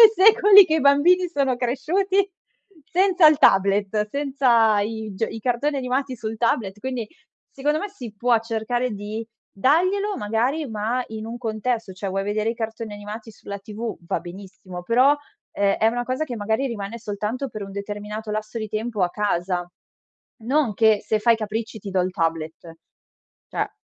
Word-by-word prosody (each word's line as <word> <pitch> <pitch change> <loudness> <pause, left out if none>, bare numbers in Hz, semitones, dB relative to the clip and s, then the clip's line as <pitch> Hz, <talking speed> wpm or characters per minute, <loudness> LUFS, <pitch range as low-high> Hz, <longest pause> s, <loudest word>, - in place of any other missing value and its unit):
e 450 - +12
secoli 410 0 +8
che 315 -1 +1
i - - 0
bambini 340 +7 +4
sono 275 -6 0
cresciuti 370 +11 +1 0.6
senza 360 -1 +5
il 305 -1 +3
tablet 200 0 +3
senza 245 -6 +2
i 220 0 -4
g 225 +3 -1
i 225 - -7
cartoni 265 +5 0
animati 260 0 -2
sul 220 0 -5
tablet, 215 -4 0
quindi, 255 -4 -3 0.4
secondo 295 +3 -1
me, 410 - -4
si 245 - -9
può 240 +1 +3
cercare 235 +2 -2
di 210 +2 -5 0.3
daglielo, 370 - +2
magari, 240 +9 -1
ma 225 +4 -1
in 220 0 -6
un 235 +1 -6
contesto, 225 -2 -2
cioè 195 +1 -5
vuoi 195 +1 -2
vedere 210 +2 0
i 235 - -4
cartoni 225 -1 -5
animati 210 +2 -8
sulla 200 -1 -8
TV, 215 +2 -6
va - - -1
benissimo, 185 0 -10
però, 255 +8 +4 0.4
ehm, 200 -1 +2
è 220 - +2
una 240 +2 +1
cosa 260 +5 -1
che, 250 -5 -6
magari, 220 +6 0
rimane 225 -1 -5
soltanto 215 +5 -4
per 215 -2 -7
un 195 - -7
determinato 210 +2 -6
lasso 215 +2 -4
di 215 - -3
tempo 215 -1 -2
a 175 - +2
casa, 180 -3 -1 0.7
non 260 -2 +1
che 220 -1 +4
se 215 +1 0
fai 235 +1 +5
i - - -3
capricci, 220 +1 -4
ti 205 - -9
do 190 - +1
il 185 - -1
tablet, 165 -1 -3 0.7
cioè, - - -2
225 Hz, 175 wpm, -23 LUFS, 205-265 Hz, 0.7 s, e